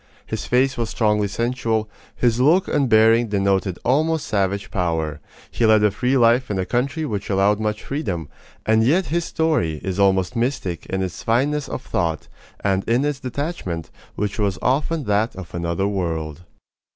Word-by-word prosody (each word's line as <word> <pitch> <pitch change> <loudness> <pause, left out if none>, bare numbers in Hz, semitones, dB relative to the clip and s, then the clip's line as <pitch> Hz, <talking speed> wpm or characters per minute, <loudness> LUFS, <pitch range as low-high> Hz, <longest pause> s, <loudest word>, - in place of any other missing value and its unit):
His - - -5
face 130 +2 +2
was 115 -2 -1
strongly 105 -2 +1
sensual, 115 0 -1 0.3
his 120 -1 +1
look 160 +9 +4
and 140 -3 +1
bearing 115 +1 +5
denoted 100 -2 0
almost 155 +5 +2
savage 100 -1 -1
power; 80 -6 -1 0.3
he - - -2
led 110 -1 +5
a 105 - +4
free 125 +6 +1
life 120 +1 +4
in 100 - -1
a 95 - -1
country 135 - -1
which 105 -8 -4
allowed 100 +1 +2
much 105 -1 -2
freedom; 95 - -3 0.4
and 110 0 +3
yet 170 +10 +3
his 170 -1 +1
story 145 - 0
is 95 0 -3
almost 95 +2 +2
mystic 115 - -2
in 95 0 -2
its 90 -1 -5
fineness 140 +5 0
of - - -5
thought, 85 -3 -2 0.4
and 95 -1 +1
in 120 +5 +2
its 145 -2 -1
detachment, 125 - -4 0.2
which 105 +2 -3
was 100 -2 0
often 150 +4 +1
that 105 +1 0
of 95 -2 -9
another 85 +2 -1
world. 85 -4 -3
110 Hz, 170 wpm, -22 LUFS, 95-130 Hz, 0.4 s, bearing